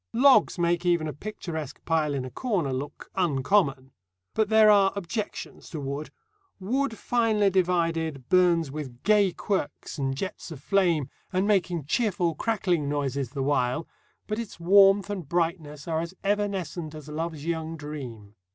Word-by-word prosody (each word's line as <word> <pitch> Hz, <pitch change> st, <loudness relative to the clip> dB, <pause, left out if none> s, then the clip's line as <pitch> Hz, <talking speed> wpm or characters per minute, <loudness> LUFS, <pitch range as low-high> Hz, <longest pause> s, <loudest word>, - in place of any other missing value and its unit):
Logs 260 Hz, -2 st, +5 dB
make 175 Hz, 0 st, +1 dB
even 170 Hz, -3 st, +2 dB
a 150 Hz, -, -4 dB
picturesque 160 Hz, -5 st, -6 dB
pile 155 Hz, -3 st, +1 dB
in 130 Hz, -2 st, -2 dB
a 130 Hz, -, -7 dB
corner 185 Hz, -, -1 dB
look 135 Hz, +3 st, -6 dB
"uncommon." 140 Hz, -4 st, +1 dB, 0.4 s
But 220 Hz, -2 st, +1 dB
there 220 Hz, -1 st, +7 dB
are 195 Hz, -2 st, +5 dB
objections 200 Hz, +3 st, -5 dB
to 160 Hz, -, -5 dB
wood. 140 Hz, +2 st, -4 dB, 0.5 s
Wood 235 Hz, +4 st, -1 dB
finely 220 Hz, -4 st, +2 dB
divided 165 Hz, -6 st, 0 dB
burns 170 Hz, -5 st, +3 dB
with 135 Hz, -5 st, -7 dB
gay 205 Hz, -2 st, +4 dB
quirks 185 Hz, -5 st, -3 dB
and 135 Hz, -1 st, -1 dB
jets 185 Hz, +3 st, -5 dB
of 160 Hz, -5 st, -8 dB
flame, 170 Hz, -4 st, +1 dB, 0.2 s
and 190 Hz, +1 st, +1 dB
making 180 Hz, -7 st, +1 dB
cheerful 180 Hz, -2 st, +1 dB
crackling 180 Hz, -8 st, 0 dB
noises 140 Hz, -3 st, -1 dB
the 135 Hz, +1 st, -3 dB
while; 135 Hz, +1 st, 0 dB, 0.4 s
but 215 Hz, +1 st, -3 dB
its 225 Hz, -6 st, -7 dB
warmth 195 Hz, +2 st, +5 dB
and 180 Hz, -8 st, -5 dB
brightness 165 Hz, -3 st, -2 dB
are 160 Hz, -1 st, 0 dB
as 170 Hz, +3 st, -6 dB
evanescent 195 Hz, -6 st, -2 dB
as 155 Hz, -2 st, -10 dB
love's 155 Hz, 0 st, -4 dB
young 165 Hz, -1 st, -3 dB
dream. 130 Hz, -9 st, -8 dB
170 Hz, 150 wpm, -26 LUFS, 145-195 Hz, 0.5 s, there